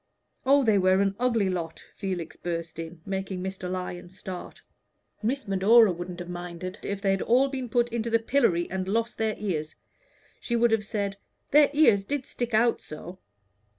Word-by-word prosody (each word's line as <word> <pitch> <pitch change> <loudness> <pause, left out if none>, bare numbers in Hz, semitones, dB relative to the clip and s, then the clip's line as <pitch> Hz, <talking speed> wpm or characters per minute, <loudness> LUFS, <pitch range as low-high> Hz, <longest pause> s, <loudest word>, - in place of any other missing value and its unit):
"Oh, 280 +1 +6
they 215 -4 +4
were 185 0 +4
an 195 0 +1
ugly 230 -5 +2
lot!" 170 -3 -3
Felix 185 -4 -4
burst 170 -1 -5
in, 165 0 -7
making 190 -1 -3
Mr. 190 -1 -4
Lyon 180 -1 -5
start. 185 0 -8 0.6
"Miss 250 +3 -1
Medora 200 +3 +6
wouldn't 175 0 -6
have 175 - -6
minded 175 +2 -6
if 200 0 -4
they 195 - +3
had 195 - 0
all 260 +4 +3
been 260 -3 -4
put 240 +2 +2
into 235 0 -2
the 230 - +4
pillory 225 -7 +2
and 190 0 -2
lost 230 +4 -1
their 220 -1 +1
ears. 160 -7 -3 0.6
She 235 - -2
would 235 0 +3
have 215 -1 +1
said, 200 -3 -2 0.3
'Their 295 0 +6
ears 255 -10 +5
did 275 +5 -3
stick 240 -4 -3
out 235 +2 +3
so.' 175 +4 -9
195 Hz, 180 wpm, -27 LUFS, 180-235 Hz, 0.6 s, Oh